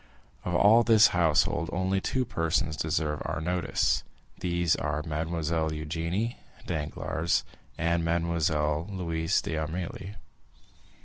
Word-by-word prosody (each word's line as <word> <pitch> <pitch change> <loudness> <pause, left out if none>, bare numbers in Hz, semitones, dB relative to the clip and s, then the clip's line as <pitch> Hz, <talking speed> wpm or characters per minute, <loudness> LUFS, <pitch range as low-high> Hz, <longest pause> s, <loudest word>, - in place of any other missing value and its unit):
Of 90 - -2
all 110 +5 +6
this 110 -2 +6
household, 85 -1 +2
only 95 +2 0
two 130 +4 0
persons 80 - 0
deserve 75 -1 -1
our - - -3
notice; 90 +2 0 0.4
these 85 -2 +1
are 75 - -2
Mademoiselle 80 0 -1
Eugénie 85 +8 -2 0.3
Danglars 80 +1 -1 0.3
and 85 0 +1
Mademoiselle 80 -2 0
Louise 85 -4 0
d'Armilly. 85 +5 -4
85 Hz, 105 wpm, -28 LUFS, 80-90 Hz, 0.4 s, all